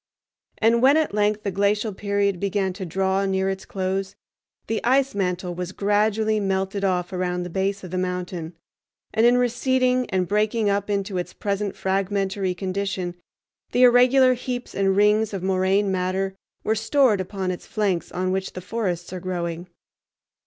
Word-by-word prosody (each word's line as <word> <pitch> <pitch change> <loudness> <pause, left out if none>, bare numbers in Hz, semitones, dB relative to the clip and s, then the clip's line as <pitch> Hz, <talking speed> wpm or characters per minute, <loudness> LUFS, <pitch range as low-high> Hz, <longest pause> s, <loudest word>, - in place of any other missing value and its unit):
And 230 +1 +3
when 275 +4 +6
at 310 -8 0
length 210 0 +1
the 200 - -1
glacial 205 +3 +1
period 200 -1 0
began 195 -1 -1
to 185 -1 -6
draw 190 +3 0
near 190 0 +1
its 190 0 -6
close, 190 +1 -3 0.5
the 225 - -2
ice 270 +2 +3
mantle 180 -2 -2
was 180 +1 -5
gradually 215 +1 +1
melted 195 0 -1
off 180 -1 0
around 180 -1 -1
the 175 - -7
base 195 +2 -1
of 180 - -8
the 185 - -1
mountain, 180 -2 -4 0.6
and 225 +2 +4
in 245 +1 +5
receding 250 +1 +1
and 185 -1 0
breaking 210 +1 +1
up 200 +1 -1
into 200 -2 -1
its 175 - -5
present 200 -1 -2
fragmentary 195 0 -1
condition 190 -1 -3 0.6
the 250 - +4
irregular 250 +1 +6
heaps 245 0 -5
and 195 -1 +1
rings 210 +1 +3
of 185 - -5
moraine 190 +1 +2
matter 190 +1 -1 0.3
were 220 - +1
stored 225 -1 +2
upon 185 0 -3
its 180 - -7
flanks 200 -5 -1
on 185 +1 -1
which 190 0 -2
the 185 - -6
forests 180 -4 -3
are 185 - -4
growing. 175 -1 -4
195 Hz, 165 wpm, -23 LUFS, 185-215 Hz, 0.6 s, when